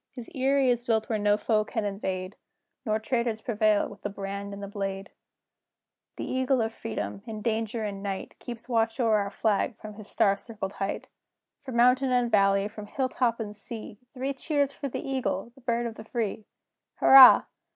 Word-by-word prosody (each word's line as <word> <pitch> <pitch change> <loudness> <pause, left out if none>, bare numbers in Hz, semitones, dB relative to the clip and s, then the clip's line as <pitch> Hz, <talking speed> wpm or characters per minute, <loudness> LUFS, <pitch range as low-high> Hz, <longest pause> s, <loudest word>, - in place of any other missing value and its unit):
His 245 -3 -10
eyrie 270 0 +2
is 240 0 0
built 220 -2 0
where 220 -2 0
no 205 0 +3
foe 215 -1 +1
can 220 0 -3
invade, 190 -1 -3 0.5
Nor 215 0 +2
traitors 230 0 -1
prevail 215 -2 +2
with 205 -1 -13
the 205 - -3
brand 200 0 -5
and 200 0 -7
the - - -4
blade! 195 -1 -4
CHORUS. - - -54
The - - -5
Eagle 260 0 +1
of 225 0 -2
Freedom, 220 -3 -5
in 215 -2 -6
danger 225 0 -1
and 200 -2 -4
night, 195 -1 -5
Keeps 235 -1 -8
watch 225 0 0
o'er 225 -3 +3
our 200 -1 -1
flag 215 +3 0
from 215 -1 -9
his 210 -1 -10
star 200 -1 +3
circled 200 -2 -6
height. 195 0 -4 0.5
From 260 - -8
mountain 250 +2 +4
and 245 -1 +2
valley, 195 0 +3
from 210 -1 -9
hill 260 +3 -1
top 240 -3 0
and 210 -2 -5
sea, 210 0 -8
Three 270 +1 -3
cheers 285 0 0
for 280 -1 -5
the - - -5
Eagle, 255 -5 -2
the 270 - -19
Bird 240 -1 -1
of 230 - -3
the 220 - -10
Free! 220 -2 -3 0.5
Hurrah! 265 -1 +9
220 Hz, 195 wpm, -27 LUFS, 205-245 Hz, 0.5 s, Hurrah